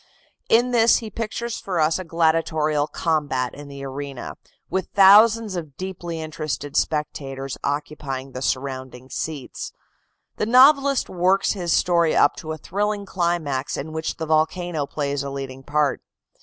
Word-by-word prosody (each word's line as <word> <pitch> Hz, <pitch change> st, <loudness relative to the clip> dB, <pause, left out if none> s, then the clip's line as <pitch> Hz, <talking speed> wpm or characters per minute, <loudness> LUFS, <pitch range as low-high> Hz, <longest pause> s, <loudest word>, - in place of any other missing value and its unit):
In 240 Hz, +2 st, +4 dB
this 230 Hz, -1 st, +5 dB
he 220 Hz, -2 st, -6 dB
pictures 230 Hz, +2 st, -4 dB
for 185 Hz, -3 st, -3 dB
us 155 Hz, +3 st, +2 dB
a -, -, -4 dB
gladiatorial 160 Hz, -3 st, +1 dB
combat 145 Hz, -8 st, -1 dB
in 145 Hz, 0 st, -10 dB
the 140 Hz, -1 st, -9 dB
arena, 135 Hz, -1 st, -6 dB, 0.3 s
with 190 Hz, -, -2 dB
thousands 210 Hz, +2 st, +6 dB
of 155 Hz, -6 st, -6 dB
deeply 175 Hz, -3 st, -5 dB
interested 155 Hz, -2 st, -4 dB
spectators 135 Hz, -3 st, -2 dB
occupying 140 Hz, -2 st, -3 dB
the 130 Hz, -, -6 dB
surrounding 130 Hz, -1 st, -3 dB
seats. 150 Hz, -5 st, -5 dB, 0.6 s
The 210 Hz, -, -1 dB
novelist 275 Hz, +2 st, +5 dB
works 185 Hz, +2 st, +2 dB
his 175 Hz, -4 st, -2 dB
story 170 Hz, -2 st, +3 dB
up 145 Hz, -, +4 dB
to 160 Hz, -, -6 dB
a 160 Hz, -, -4 dB
thrilling 205 Hz, +4 st, -2 dB
climax 170 Hz, -8 st, -1 dB
in 155 Hz, +3 st, -5 dB
which 160 Hz, 0 st, -3 dB
the 160 Hz, -, -3 dB
volcano 160 Hz, 0 st, 0 dB
plays 140 Hz, -2 st, -2 dB
a 140 Hz, -, -4 dB
leading 135 Hz, -1 st, -6 dB
part. 145 Hz, 0 st, 0 dB
160 Hz, 145 wpm, -23 LUFS, 140-190 Hz, 0.6 s, thousands